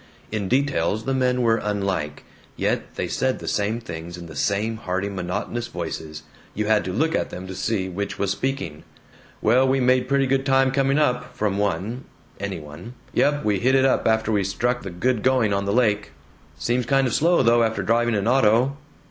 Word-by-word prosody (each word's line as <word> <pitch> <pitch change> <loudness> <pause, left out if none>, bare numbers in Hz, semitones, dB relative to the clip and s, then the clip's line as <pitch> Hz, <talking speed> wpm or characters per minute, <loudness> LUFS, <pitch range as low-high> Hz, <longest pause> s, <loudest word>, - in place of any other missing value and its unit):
In 105 -3 -2
details 125 - +1
the 135 - 0
men 125 -1 +1
were 115 -1 +3
unlike, 95 -8 -2 0.3
yet - - -2
they - - -2
said - - 0
the - - -9
same 105 +3 0
things 85 -5 -7
in 85 - -9
the 80 -2 -10
same 105 +7 0
hearty 95 0 -2
monotonous 100 +5 -3
voices. 80 -5 -6 0.3
You 105 - -1
had 110 0 +3
to 95 - -2
look 160 - +1
at - - 0
them 90 - -7
to 95 - -7
see 95 0 -1
which 100 +2 -4
was 100 -1 0
speaking. 100 - -3 0.6
"Well, 125 +4 +4
we 135 +1 +2
made 125 0 +2
pretty 140 0 +3
good 135 0 +1
time 135 -1 +3
coming 135 +1 +2
up," 125 -4 0
from 100 -3 0
one 105 +5 -2 0.3
any 100 -3 -4
one. 80 +11 -10 0.2
"Yump, 145 0 +2
we 105 -2 +2
hit 130 +6 +3
it 135 0 +4
up 135 - +2
after 110 0 +2
we 100 -2 +2
struck 120 +6 -1
the 100 - -6
good 110 +7 0
going 125 -5 +2
on 100 0 0
the 100 - 0
lake." 105 -3 +2 0.5
"Seems 120 0 -1
kind 135 +1 +3
of 125 - -1
slow 170 -1 +3
though, 120 0 +4
after 110 -1 0
driving 120 0 +2
an 100 +1 0
auto." 125 +2 +3
110 Hz, 200 wpm, -23 LUFS, 95-130 Hz, 0.6 s, Well